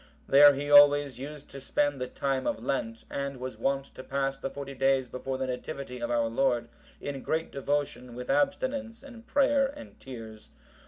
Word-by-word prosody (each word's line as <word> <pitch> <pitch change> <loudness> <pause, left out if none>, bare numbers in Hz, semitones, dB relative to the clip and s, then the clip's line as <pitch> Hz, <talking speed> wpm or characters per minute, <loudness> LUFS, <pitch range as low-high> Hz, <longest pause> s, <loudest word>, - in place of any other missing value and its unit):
There 145 +1 +8
he 145 +1 -3
always 145 -3 +7
used 145 +1 -8
to 135 - -9
spend 145 0 0
the 125 - -1
time 135 0 -2
of 110 - -2
Lent, 115 -4 -2
and 140 -1 -3
was 130 +1 -6
wont 135 0 -1
to - - -9
pass 135 0 -1
the 135 - -5
forty 140 0 -7
days 135 -1 +2
before 130 +1 -4
the 130 - -2
Nativity 130 0 -5
of 120 0 -3
our 120 -1 +2
Lord, 120 0 +1 0.3
in 140 -2 -5
great 160 +4 -2
devotion 140 -3 -2
with 125 0 -6
abstinence 275 -4 0
and 240 -4 -13
prayer 280 -1 +3
and 285 +2 -11
tears. 110 -4 -10
135 Hz, 180 wpm, -29 LUFS, 125-145 Hz, 0.3 s, There